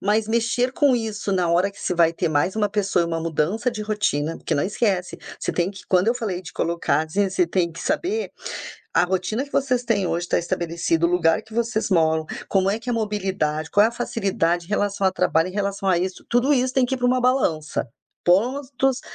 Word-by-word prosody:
Mas 210 +2 +1
mexer 235 +2 +1
com 280 -1 +3
isso 220 -3 -2
na 180 -3 +1
hora 180 +4 +2
que - - -15
você - - -1
vai 165 -1 +3
ter 165 - -1
mais 155 +4 +1
uma 210 -2 +1
pessoa 195 -3 +1
e 170 - -1
uma 165 -1 -2
mudança 165 +9 0
de 230 -3 -3
rotina, 205 -8 -1
porque - - -2
não 145 - +1
esquece, 195 -3 -1 0.2
você - - -1
tem 175 +1 0
que 195 - -11
quando 185 +2 +3
eu 235 - +3
falei 210 -7 -3
de 175 - -10
colocar, 170 -2 0
assim, 195 +5 0
você 185 -1 +2
tem 170 -1 0
que 165 - -9
saber 360 +10 -1 0.6
a - - +4
rotina 190 +7 -1
que 285 - -18
vocês 255 -2 +1
têm 205 -6 +1
hoje 170 +1 -1
tá - - +1
estabelecido, 170 -1 0
o - - -1
lugar 170 +1 +3
que 220 - -15
vocês 230 -1 0
moram, 160 -4 +2 0.2
como 195 -1 +2
é 215 +3 0
que 245 - -4
é - - +1
a - - 0
mobilidade, 190 -8 -1
qual 205 - +5
é - - +4
a 235 - -8
facilidade 185 -8 -1
em - - -20
relação 205 -2 0
a 190 - +2
trabalho, 165 -1 +2
em - - -12
relação 200 -1 -2
a 185 - +4
isso. 185 +1 -3
Tudo 245 +4 +3
isso 255 -1 +1
tem 265 - +4
que 250 - -1
ir - - -10
pra 245 - +1
uma 255 +1 +2
balança. 170 - +1 0.4
Pontos 255 +7 +1
195 Hz, 230 wpm, -23 LUFS, 170-230 Hz, 0.6 s, qual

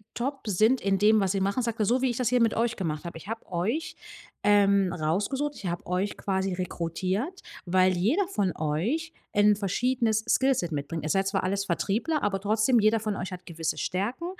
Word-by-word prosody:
top 265 +1 -4
sind 215 +6 +3
in 195 -1 +1
dem, 215 +1 +5
was 190 -1 +1
sie 195 - 0
machen.“ 200 +6 0
Sagt 230 -1 -3
er: 215 - +2
„So 245 +5 +2
wie 260 - +2
ich 240 - -5
das 250 -3 +1
hier 250 0 +2
mit 230 -1 +3
euch 235 0 0
gemacht 155 -5 -3
hab, 170 - -6
ich 165 - -12
hab 225 0 -5
euch, 235 - -2 0.5
ähm, 200 -3 +4
rausgesucht, 205 - -1
ich - - -10
hab 175 0 -4
euch 185 +3 -1
quasi 190 -1 -1
rekrutiert, 185 - -3 0.2
weil 185 +1 +3
jeder 285 - +2
von 200 - -1
euch 215 - -1 0.2
'n 205 0 +5
verschiedenes 220 +2 0
Skillset 260 -11 +2
mitbringt. 150 +2 -4
Ihr 155 - -3
seid 195 +5 +2
ja - - +1
zwar 195 - 0
alles 195 +1 -1
Vertriebler, 220 - -1
aber 200 -2 0
trotzdem, 215 +4 +3
jeder 215 +1 +3
von 215 -1 -2
euch 185 0 -5
hat 180 0 -8
gewisse 165 -1 -3
Stärken 215 - -2
205 Hz, 210 wpm, -27 LUFS, 185-235 Hz, 0.5 s, dem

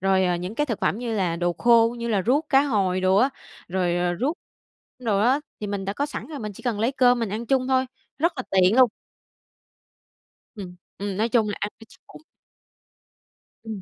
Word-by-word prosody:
rồi, 190 0 +2
ờ, 180 -1 +1
những 180 +5 -5
cái 295 +3 0
thực 230 -5 -3
phẩm 210 - 0
như 235 -2 -3
là 180 -5 0
đồ 175 0 0
khô, 235 +2 +4
như 235 0 -3
là 205 -4 +1
ruốc 290 +5 +2
cá 275 -1 +5
hồi 195 -9 0
đồ 185 +1 +3
á, 260 +6 +4 0.4
rồi, 175 -1 0
ờ, 175 0 0
ruốc 300 +7 -1 0.6
đồ 220 -5 0
á, 255 +7 +3 0.2
thì 210 - -3
mình 200 -1 -3
đã 195 - -2
có 285 +7 -2
sẵn - - -7
rồi 300 -3 -7
mình 210 -2 -5
chỉ - - -13
cần 230 -5 -2
lấy 240 +5 +1
cơm 250 -2 +4
mình 230 -3 -1
ăn 220 +4 -4
chung 260 0 +1
thôi, 260 0 +2 0.3
rất 335 +3 +2
là 255 - -3
tiện 190 +4 +4
luôn. 255 -2 +7 1.7
Ừm, 185 -4 -8 0.2
ừm, 200 -1 -4
nói 225 +2 +1
chung 225 -3 +2
là 205 - -3
ăn 210 - -1
cho 225 - -13
chắc 275 - -19
bụng. - - -12 1.4
Ừm. 220 -4 -6
220 Hz, 220 wpm, -24 LUFS, 190-255 Hz, 1.7 s, luôn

